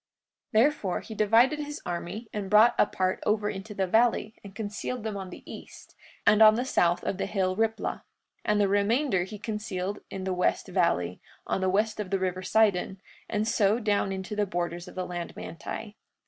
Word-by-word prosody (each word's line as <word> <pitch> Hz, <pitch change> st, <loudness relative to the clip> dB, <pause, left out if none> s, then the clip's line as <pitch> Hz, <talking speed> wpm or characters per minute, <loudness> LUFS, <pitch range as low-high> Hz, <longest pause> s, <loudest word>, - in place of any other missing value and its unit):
43:31 220 Hz, -, +7 dB
Therefore, 265 Hz, -11 st, 0 dB
he 220 Hz, -, -9 dB
divided 230 Hz, +8 st, +4 dB
his 295 Hz, 0 st, -5 dB
army 175 Hz, +6 st, -4 dB
and 205 Hz, -2 st, -4 dB
brought 215 Hz, +3 st, +6 dB
a -, -, +5 dB
part 185 Hz, -1 st, -1 dB
over 210 Hz, 0 st, +1 dB
into 205 Hz, +2 st, -8 dB
the 195 Hz, -, +1 dB
valley, 220 Hz, +2 st, +2 dB
and 200 Hz, -1 st, -11 dB
concealed 215 Hz, +3 st, -4 dB
them 220 Hz, -2 st, -3 dB
on 190 Hz, -2 st, -5 dB
the -, -, -11 dB
east, -, -, -11 dB, 0.3 s
and 215 Hz, +1 st, +5 dB
on 215 Hz, 0 st, +9 dB
the 245 Hz, +3 st, -1 dB
south 175 Hz, -8 st, +2 dB
of 190 Hz, -, -2 dB
the -, -, -1 dB
hill 185 Hz, -2 st, 0 dB
Riplah; 220 Hz, +1 st, -1 dB
43:32 -, -, -23 dB, 0.4 s
And 210 Hz, 0 st, +2 dB
the 200 Hz, -, +4 dB
remainder 205 Hz, +1 st, +2 dB
he 210 Hz, +2 st, -8 dB
concealed 205 Hz, -2 st, -4 dB
in 190 Hz, -, -6 dB
the 190 Hz, 0 st, -1 dB
west 180 Hz, 0 st, 0 dB
valley, 90 Hz, -, 0 dB, 0.2 s
on -, -, -1 dB
the 190 Hz, -, +2 dB
west 215 Hz, +3 st, +1 dB
of 205 Hz, -3 st, -3 dB
the 195 Hz, -, +1 dB
river 185 Hz, -1 st, -2 dB
Sidon, 190 Hz, -1 st, +2 dB, 0.3 s
and 215 Hz, 0 st, 0 dB
so 215 Hz, -2 st, +3 dB
down 205 Hz, -3 st, 0 dB
into 190 Hz, +2 st, -4 dB
the 210 Hz, -1 st, 0 dB
borders 175 Hz, -1 st, -3 dB
of -, -, -11 dB
the 185 Hz, -1 st, -2 dB
land 175 Hz, -1 st, -5 dB
Manti. 210 Hz, +5 st, -7 dB
205 Hz, 205 wpm, -28 LUFS, 185-220 Hz, 0.4 s, on